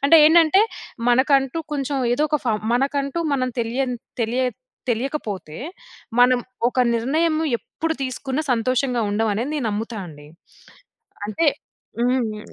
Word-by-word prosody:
అంటే 325 +4 +7
ఏంటంటే 335 +4 +6 0.5
మనకంటూ 270 +3 +3 0.2
కొంచెం 275 0 -2 0.2
ఏదో 295 - 0
ఒక 300 - +2
ఫౌం 215 -2 +2 0.2
మనకంటూ 275 +3 0 0.2
మనం 255 -1 0
తెలియని 245 +2 -1 0.3
తెలియ 235 +3 0 0.5
తెలియకపోతే 225 - -3 0.6
మనం 250 +1 +6 0.3
ఒక 255 - -5 0.2
నిర్ణయము 310 +7 +1
ఎప్పుడు 320 +1 -4
తీసుకున్నా 265 +2 -2
సంతోషంగా 250 +1 +1
ఉండం 220 +2 +1
అనేది 235 +7 -2
నేను 270 -6 -1
నమ్ముతా 220 +2 -3
అండి. 145 -2 -12 1.0
అంటే 305 +10 0 0.5
హ్మ్ 250 0 +2
హ్మ్, 210 0 -8
255 Hz, 125 wpm, -22 LUFS, 230-285 Hz, 1.0 s, అంటే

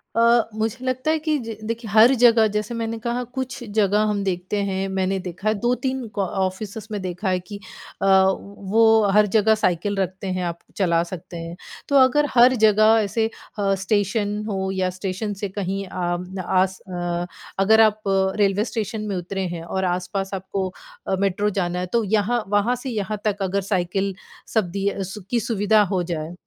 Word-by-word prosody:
अ, 235 0 +5
मुझे 220 +3 -3
लगता 255 +4 0
है 320 - +1
कि 310 -1 +2
जी 225 -2 -6
देखिए 230 0 -4
हर 225 +5 +7
जगह 230 -2 +6
जैसे 210 +2 -2
मैंने 230 0 -3
कहा 240 +2 -2
कुछ 250 0 -5
जगह 210 -1 +3
हम 205 -1 -1
देखते 185 +1 -2
हैं, 190 0 -1
मैंने 190 0 0
देखा 185 +2 -6
है 215 - +4
2-3 250 +1 -1
का 200 - +1 0.2
ऑफिसेस 200 +3 -4
में 210 - -2
देखा 185 +2 -3
है 185 0 +1
कि 200 +3 -9 0.4
अ, - - +1
वो 200 +3 +3
हर 210 +1 +5
जगह 220 +1 +5
साइकिल 200 0 0
रखते 190 0 -2
हैं 185 -1 -2
आप 170 0 -4 0.2
चला 170 -4 +2
सकते 175 0 -8
हैं। 165 0 -6 0.3
तो 280 - +1
अगर 265 +3 +5
हर 250 +1 +6
जगह 215 +1 +5
ऐसे 220 +2 0 0.3
अ, 195 -1 +2
स्टेशन 205 +2 0
हो 190 -1 -2
या 190 -1 0
स्टेशन 190 +3 -4
से 200 - -1
कहीं 195 +1 -2
अ, 180 +1 -3
आस 185 +1 +1
अ, 175 -1 -2 0.3
अगर 220 +3 +5
आप 215 -1 +3 0.4
रेलवे 205 0 +2
स्टेशन 220 -2 -3
में 200 - -2
उतरे 185 +2 -3
हैं 165 - -7
और 190 +3 -2
आस-पास 185 +2 -2
आपको 190 0 -3 0.4
अ, - - +1
मेट्रो 200 +1 +1
जाना 175 0 -2
है 180 - -2
तो 235 -1 +3
यहाँ 215 +3 +1
वहाँ 205 +5 +2
से 250 +2 -6
यहाँ 215 -2 -2
तक 205 -1 0
अगर 195 +1 0
साइकिल 195 +1 0 0.4
सब 215 -6 +1
दी 195 +1 -3
है, 200 -1 -1
सु 190 +3 -7
की 240 - +1
सुविधा 215 -1 +2
हो 185 -2 +1
जाए, 165 -1 -4
200 Hz, 190 wpm, -22 LUFS, 185-220 Hz, 0.4 s, हर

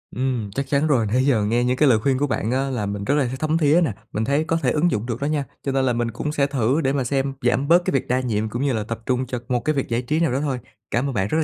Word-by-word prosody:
Ừm, 125 -5 -2
chắc 135 +6 -3
chắn 140 +3 +1
rồi. 130 -7 +2
Nãy 125 +5 +1
giờ 120 -7 +3
nghe 120 +3 +1
những 125 +1 +1
cái 150 0 +4
lời 110 -3 +4
khuyên 135 +1 +1
của 145 +2 0
bạn 115 -4 -1
á 135 +2 0
là 120 -6 -2
mình 100 0 -4
rất 140 +8 +1
là 145 -3 +2
th 130 +2 -5
thấm 155 +1 +1
thía 155 +2 +4
này, 140 -10 -1 0.2
mình 110 - -1
thấy 140 +5 +1
có 165 +1 0
thể - - +3
ứng 165 +3 +2
dụng 105 +2 -1
được 120 0 -4
đó - - 0
nha, 150 -1 0 0.2
cho 140 - -1
nên 135 0 +1
là 125 - +2
mình 120 0 -1
cũng 140 +6 -3
sẽ 145 -2 +1
thử 135 +1 +1
để 135 -2 +1
mà 140 -2 0
xem 135 +2 -1
giảm 125 +2 +1
bớt 175 +2 +5
cái - - +1
việc 135 - 0
đa 125 +1 +1
nhiệm 110 -4 -1
cũng 120 - -4
như 140 -1 +1
là 110 -2 -1
tập 115 +2 -5
trung 130 0 0
cho 125 -1 -4
một 125 - +1
cái 155 0 +1
việc 135 - -2
giải 115 +1 0
trí 150 +6 -1
nào 165 -4 +2
đó 130 - 0
thôi. 135 -4 -1 0.3
Cảm 120 +4 +1
ơn - - -4
bạn 95 -4 0
rất 155 - 0
là 160 - +3
130 Hz, 345 wpm, -22 LUFS, 120-145 Hz, 0.3 s, bớt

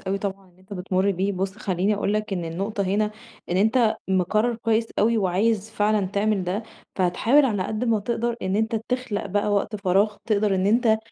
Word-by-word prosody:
أوي 195 +1 -2
طبعًا 195 -1 -5
اللي 180 +1 -26
أنتَ 190 +2 -15
بتمُر 190 +1 0
بيه. 195 +2 -1
بُص 190 +2 -3
خلِّيني 195 0 0
أقول 205 0 -1
لك 215 -1 -2
إن 175 -3 -2
النقطة 195 +5 -3
هنا، 205 +3 0 0.4
إن 180 - +1
أنتَ 220 +2 +3
مقرّر 210 +6 +1
كويِس 225 0 +1
أوي 225 +1 +3
وعايِز 205 +3 +1
فعلًا 210 -2 +1
تعمل 200 0 0
ده، 190 +5 -2 0.3
فهتحاول 215 +10 +3
على 205 -7 0
قد 220 +5 -3
ما 230 -3 +2
تقدَر 235 +2 -2
إن 190 +1 0
أنتَ 220 +1 0
تخلق 250 -5 -2
بقى 205 +2 0
وقت 205 +1 0
فراغ 200 +2 +1
تقدَر 210 -2 +2
إن 190 0 +1
أنتَ 220 +1 +3
205 Hz, 195 wpm, -24 LUFS, 190-220 Hz, 0.4 s, أنتَ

